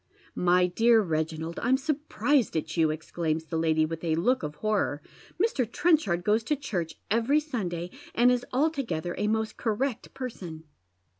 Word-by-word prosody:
" - - -32
My 180 0 +5
dear 225 +4 +4
Keginald, 160 0 -2
I'm 255 +3 +3
surprised 290 - 0
at 155 0 -3
you," 160 -2 +3
exclaims 160 0 -2
the 165 - -5
lady, 160 -1 +3
with 165 +1 -5
a 160 -2 +1
look 245 +11 +2
of 150 -1 -5
horror. 210 -8 0 0.2
" - - -24
Mr. 280 - +1
Trenchard 265 - +2
goes 215 +3 +2
to 300 - +1
church 180 - -3 0.2
every 235 +7 +3
Sunday, 180 - -4 0.2
and 245 +2 +5
is 245 -1 +1
altogether 250 - 0
a 210 - +1
most 220 0 -1
correct 235 +2 -2
person. 180 -11 -6
210 Hz, 165 wpm, -28 LUFS, 165-255 Hz, 0.2 s, My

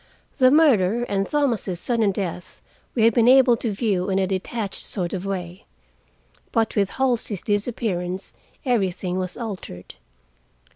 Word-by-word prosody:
The 255 -1 +7
murder 240 - +4
and 195 -4 -1
Thomas' 235 - 0
sudden 225 -3 +1
death 185 -2 -5 0.4
we 230 - +2
had 230 0 +5
been 235 +1 +3
able 255 -1 +6
to 230 -1 -2
view 200 -3 -1
in 190 - +1
a 195 - +2
detached 195 +2 -3
sort 180 -4 -4
of 190 0 -4
way. 180 0 -5 0.9
But 225 -2 0
with 200 -2 +2
Halsey's 240 -7 0
disappearance 200 -4 -2 0.3
everything 190 -6 0
was 185 -1 -4
altered. 195 - -7
205 Hz, 140 wpm, -23 LUFS, 185-235 Hz, 0.9 s, The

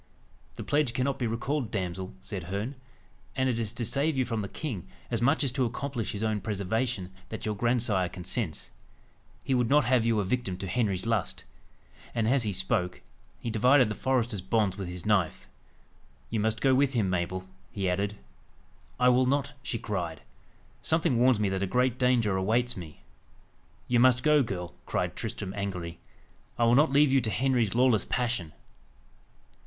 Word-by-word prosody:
"The - - -6
pledge 145 -4 +1
cannot 135 +2 0
be 120 - 0
recalled, 120 +3 -2
damsel," 95 - -4
said 90 +7 -6
Herne; 100 +8 -3 0.6
"and 130 0 +1
it 120 -3 0
is 110 -3 -1
to 120 -1 -2
save 140 +5 +1
you 130 - +2
from 115 -3 -2
the 100 - -4
king, 110 - -5 0.2
as - - 0
much 140 +6 +3
as 135 - +1
to 130 0 0
accomplish 120 -1 -3
his 105 +1 -4
own 110 -2 0
preservation, 105 -1 -2 0.2
that 110 - -6
your 105 - 0
grandsire 110 -4 +1
consents. 90 -1 -3 0.7
He 135 - 0
would 125 -2 +2
not 145 -2 +5
have 125 -1 +3
you 115 -2 +2
a - - +1
victim 95 -3 -1
to 95 - -5
Henry's 100 -3 0
lust." 115 -5 -1 0.7
And 115 -2 +1
as 130 +2 +3
he 110 -3 0
spoke, 90 -1 -1 0.4
he 115 - -4
divided 125 +3 +5
the - - -1
forester's 120 -5 0
bonds 95 0 +1
with 95 -2 -5
his 90 0 -6
knife. 100 -6 +1 0.8
"You 110 - 0
must 110 +1 0
go 135 -1 +4
with 135 +1 +3
him, 110 -6 +1
Mabel," 95 +1 -2 0.2
he 100 -2 -2
added. 100 +3 0 0.8
"I 125 0 +5
will 125 +1 +4
not!" 140 +1 0
she 120 - -3
cried. 90 -8 -4 0.6
"Something 160 -7 +1
warns 125 -2 +4
me 105 - +2
that 95 0 -2
a 100 - 0
great 125 +3 +1
danger 120 -6 +3
awaits 115 +6 +1
me." 80 -8 -10 0.8
"You 120 -1 +3
must 125 0 +5
go, 150 -1 +5
girl," 90 -7 -4
cried - - -1
Tristram 95 -1 -4
angrily. 90 -4 -4 0.6
"I 120 - +2
will 115 0 +5
not 145 +3 +5
leave 140 0 +5
you 135 - +5
to 110 - -2
Henry's 120 -1 +1
lawless 125 -3 +4
passion." 115 -10 -1
115 Hz, 180 wpm, -28 LUFS, 95-125 Hz, 0.8 s, not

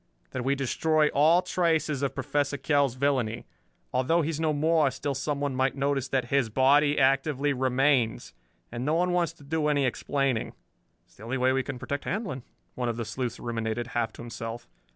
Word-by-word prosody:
"That - - -3
we 135 +2 +1
destroy 150 +3 +1
all 160 +5 +4
traces 165 -5 0
of 140 - -1
Professor 145 +1 -1
Kell's 140 -4 +1
villainy. 130 -4 0 0.5
Although 145 +7 +2
he 155 - -1
is 155 - -4
no 160 -1 +1
more, 155 0 +3
still 140 +2 -3
someone 140 0 -2
might 130 0 +1
notice 140 -1 0
that 130 -2 -1
his 135 -5 +2
body 145 +5 +4
actively 135 +1 +2
remains. 130 -2 +1 0.4
And 120 - -4
no 150 +4 +1
one 180 +2 +1
wants 175 -2 +1
to - - -18
do 150 +1 -1
any 145 -2 +2
explaining." 135 -1 -1 0.5
"It's - - -28
the - - -13
only 125 +3 -2
way 130 0 +2
we 135 - +1
can 135 0 -6
protect 140 +3 -4
Handlon," 195 - -3 0.3
one 125 -1 -2
of 115 - -3
the 115 - -3
sleuths 120 +2 -4
ruminated, 115 0 -3
half 115 -2 0
to - - -10
himself. 115 0 -7
135 Hz, 190 wpm, -27 LUFS, 125-150 Hz, 0.5 s, all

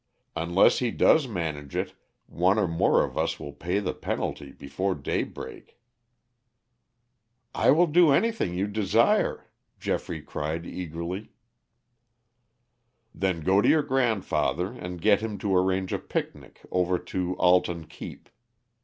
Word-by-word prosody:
Unless 85 +3 +3
he 125 - 0
does 145 +5 +4
manage 80 - -4
it - - -2 0.3
one 95 +4 +1
or 105 -3 +2
more 80 0 +3
of - - -4
us - - -1
will 70 - -7
pay 85 +6 -2
the 100 -3 -1
penalty 70 - -4
before 90 +9 -3
daybreak." 70 - -5 1.8
"I - - +2
will 165 +6 +6
do 170 0 +5
anything 145 - +1
you 95 +2 0
desire," 105 -1 +1 0.3
Geoffrey 80 -3 -3
cried 75 +2 -4
eagerly. 90 +4 -5 1.8
"Then 95 -4 -1
go 95 +5 +3
to - - +3
your 155 -2 +4
grandfather 110 - 0
and 90 0 -7
get 105 +3 +4
him 110 -2 -4
to 95 -1 0
arrange 95 0 +1
a - - -1
picnic - - -5
over 90 0 +1
to 90 0 -3
Alton 90 -2 +2
Keep. - - -10
90 Hz, 130 wpm, -26 LUFS, 85-105 Hz, 1.8 s, will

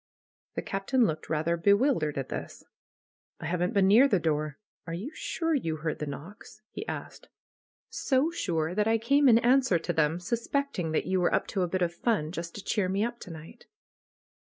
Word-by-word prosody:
The - - -3
Captain 225 +6 +1
looked 155 -4 -3
rather 160 +2 +1
bewildered 200 - +2
at 135 - -3
this. - - -6 0.8
"I - - -7
haven't 180 +2 -1
been 195 -1 +5
near 230 +8 +7
the 205 - +3
door. 155 -3 -1 0.3
Are 165 - -3
you 215 - -5
sure 330 0 -2
you 165 - 0
heard 155 0 -3
the 150 - -3
knocks?" 170 +11 -9
he 430 - -7
asked. - - -7 0.6
"So 275 +4 +1
sure 165 - -1
that 210 +2 +1
I 225 0 +3
came 275 +5 +4
in 225 - +7
answer 250 -4 +4
to 165 - -3
them, 155 +2 +1
suspecting 230 - -2
that - - +1
you 185 0 +1
were 175 - +2
up - - +1
to 195 - -1
a 180 - +1
bit 185 +1 0
of 170 -1 -1
fun, 175 -5 0
just 170 -1 -6
to 205 - -7
cheer 200 -4 0
me 195 +2 0
up 240 0 -5
to - - -10
night." 165 +9 -12
185 Hz, 200 wpm, -28 LUFS, 165-235 Hz, 0.8 s, near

